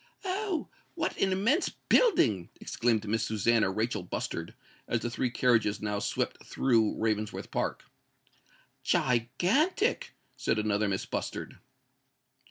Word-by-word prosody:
"Oh! 380 -2 -1 0.3
what - - -1
an 190 - +3
immense 230 - +2
building!" 115 - +2
exclaimed 115 -2 0
Miss 110 +1 +1
Susannah 110 -1 +2
Rachel 110 +2 -1
Bustard, 85 -2 -4 0.3
as 120 - 0
the 120 - -3
three 125 +1 0
carriages 120 -4 +2
now 105 -1 -2
swept - - -2
through 115 -5 +2
Ravensworth 110 -1 -2
Park. - - -2 1.0
"Gigantic!" 265 - +1 0.2
said - - 0
another 105 0 +1
Miss 95 -1 -2
Bustard. - - -5
115 Hz, 115 wpm, -29 LUFS, -, 1.0 s, an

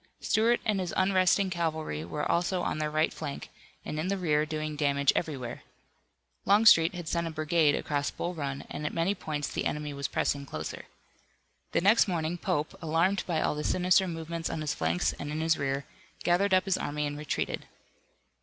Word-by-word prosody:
Stuart 230 +2 +2
and 210 -3 +1
his 180 -2 -3
unresting 190 0 +3
cavalry 160 - -2
were 150 - -3
also 175 +1 +1
on - - -1
their 155 0 0
right 155 +1 +1
flank 140 - -6 0.4
and 155 - -4
in 160 - -1
the 200 +1 0
rear, 155 -4 +1
doing 155 -1 -3
damage 140 -2 +2
everywhere. 135 -7 -3 0.8
Longstreet 195 -5 +6
had 175 -2 -6
sent 170 +1 -1
a - - -2
brigade 155 -1 +2
across 145 -1 -1
Bull 175 - -4
Run, 140 -4 -4
and 145 - -6
at 150 - -3
many 170 +4 +2
points 150 -6 -4
the - - -3
enemy 150 -1 -2
was 140 -1 -3
pressing 140 +2 -1
closer. 80 - -6 0.9
The - - +2
next 215 +4 +5
morning, 170 -1 -2
Pope, 150 -1 -1
alarmed 170 +4 +1
by 165 -3 0
all - - +1
the 150 0 -4
sinister 185 +2 +3
movements 165 0 -4
on 160 - -3
his 150 -2 -1
flanks 85 +2 0
and 145 - -4
in 155 - -3
his 160 0 +2
rear, 140 0 -1 0.4
gathered 190 +3 +3
up 185 - +2
his 195 -2 +1
army 150 +1 -2
and 145 0 -3
retreated. 150 0 -3
160 Hz, 190 wpm, -29 LUFS, 150-180 Hz, 0.9 s, Longstreet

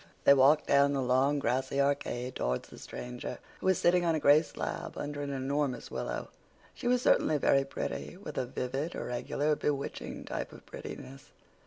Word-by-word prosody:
They - - +8
walked 140 +3 +5
down 140 0 +4
the 140 - 0
long 130 +3 +3
grassy 135 0 0
arcade 140 -3 0
towards 65 +1 -1
the - - -12
stranger, 125 0 -6 0.2
who - - -3
was 190 -2 +4
sitting 175 0 +3
on 165 -2 +2
a - - 0
gray 145 +1 +6
slab 160 - -5
under 145 0 -4
an 145 - -3
enormous 140 -1 -2
willow. - - -4 0.4
She - - -5
was 250 0 +3
certainly 155 - +4
very 135 -1 +3
pretty, 150 +5 -5
with 200 - -8
a 130 - -2
vivid, 135 +6 -3
irregular, 145 +5 -1
bewitching 140 -1 -3
type - - -4
of - - -13
prettiness. 135 +2 -9
140 Hz, 175 wpm, -31 LUFS, 130-150 Hz, 0.4 s, They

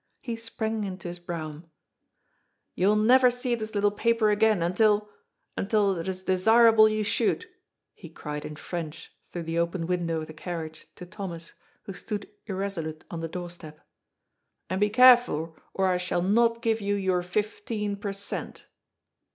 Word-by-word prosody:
He 235 -3 -4
sprang 225 -1 -3
into 185 -3 -5
his 175 0 -7
brougham. 160 -3 -6
^^ - - -26 1.1
You 185 - +1
will 210 - +4
never 250 +4 +6
see 245 0 -1
this 220 -2 -4
little 205 0 +3
paper 225 0 +2
again 210 -3 +3
until 210 +4 +2 0.2
— - - -48
until 200 -1 +2
it 165 - -5
is 185 0 -4
desirable 220 +4 +6
you 215 0 -1
should," 235 - 0 0.5
he 170 - -12
cried 150 -2 -6
in 150 0 -7
French 165 0 -6
through 175 - -6
the 165 +1 -2
open 170 0 -1
window 170 -2 -1
of - - -5
the 155 - -11
carriage 160 -1 -6
to 180 - -9
Thomas, 175 -3 -7 0.3
who 195 - -7
stood 205 +3 -5 0.2
irreso 195 -3 -2
lute 155 0 -7
on 170 - -4
the 165 - -3
doorstep. 170 -3 -8 0.5
" - - -53
And 190 +2 -1
be 210 - +4
careful, 240 -9 +5 0.2
or 190 - 0
I 180 - +2
shall 180 -1 -1
not 230 +4 +2
give 225 -1 +1
you 200 0 0
your 190 -2 +1
fifteen 210 +2 -2
per 200 0 -4
cent." 200 +1 -5
195 Hz, 175 wpm, -27 LUFS, 170-215 Hz, 1.1 s, never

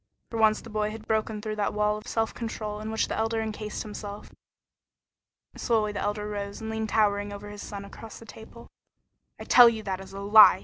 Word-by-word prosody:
For 230 - -3
once 215 -1 +4
the 230 - -11
boy 210 0 0
had 220 0 -8
broken 215 -1 -1
through 215 -1 -3
that 205 0 0
wall 210 0 +2
of 210 - -9
self 225 -1 0
control 215 -2 -4
in 215 +1 -5
which 220 0 0
the - - -3
Elder 225 0 0
encased 215 -1 -4
himself. 205 -1 -8 1.2
Slowly 220 -3 +1
the 205 - -4
Elder 210 0 -2
rose 200 -1 -5
and 220 -1 -5
leaned 220 0 -2
towering 205 -2 +2
over 205 0 -8
his 205 -1 -8
son 200 -1 -7
across 215 +2 -10
the 230 - -12
table. 225 +2 -13 0.7
"I - - -6
tell 245 -1 +8
you 220 -2 -4
that 190 -2 -3
is 190 - -11
a 195 - -7
lie!" 210 +2 +8
215 Hz, 215 wpm, -27 LUFS, 205-220 Hz, 1.2 s, tell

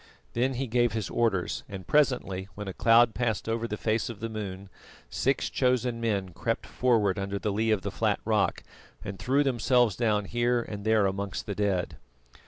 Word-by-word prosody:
Then 130 +3 +1
he 135 +2 -1
gave 120 -1 +1
his 110 -3 -3
orders, 110 -7 0
and 95 -3 -7
presently, 110 -10 +1
when 105 -1 -6
a 95 - -4
cloud 115 +2 +5
passed 115 -4 -1
over 115 +1 -1
the 105 - -4
face 110 +4 0
of 115 -4 -7
the 115 - -4
moon, 100 -3 -6 0.4
six 135 +1 0
chosen 125 -2 0
men 100 -5 0
crept 85 - -3
forward 110 -6 +1
under 100 +1 -2
the 105 +2 -2
lee 110 +2 0
of 105 -3 +1
the - - -3
flat - - 0
rock - - +1 0.4
and 100 -2 -6
threw 140 +3 +2
themselves 125 -4 +2
down 105 -4 +1
here 120 +2 +1
and 105 -2 -7
there 110 -2 +4
amongst 100 +1 -3
the 100 - -3
dead. 100 -3 -1
110 Hz, 190 wpm, -28 LUFS, 100-120 Hz, 0.4 s, cloud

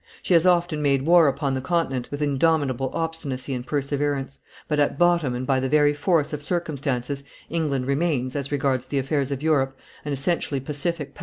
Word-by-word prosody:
She - - +1
has 170 +1 +5
often 175 -3 +2
made 140 -2 +2
war 170 0 +6
upon 140 0 0
the 130 - -2
Continent 135 -5 -1
with 145 +1 -3
indomitable 140 -3 +1
obstinacy 145 -5 -3
and 125 -1 -3
perseverance; 140 0 -2 0.3
but 150 -1 0
at 145 -1 +1
bottom 170 -7 +3
and 125 +1 -3
by 130 0 +2
the 130 0 -1
very 145 0 +4
force 150 0 +1
of 150 - -3
circumstances 145 -5 -2 0.3
England 150 -6 -1
remains, 140 -2 0
as 140 -1 -3
regards 135 -3 0
the 140 - -2
affairs 135 0 0
of 140 0 -4
Europe, 135 -4 +1 0.3
an 150 - -4
essentially 140 0 -1
pacific 150 +1 -3
power. - - -17
145 Hz, 185 wpm, -24 LUFS, 135-160 Hz, 0.3 s, war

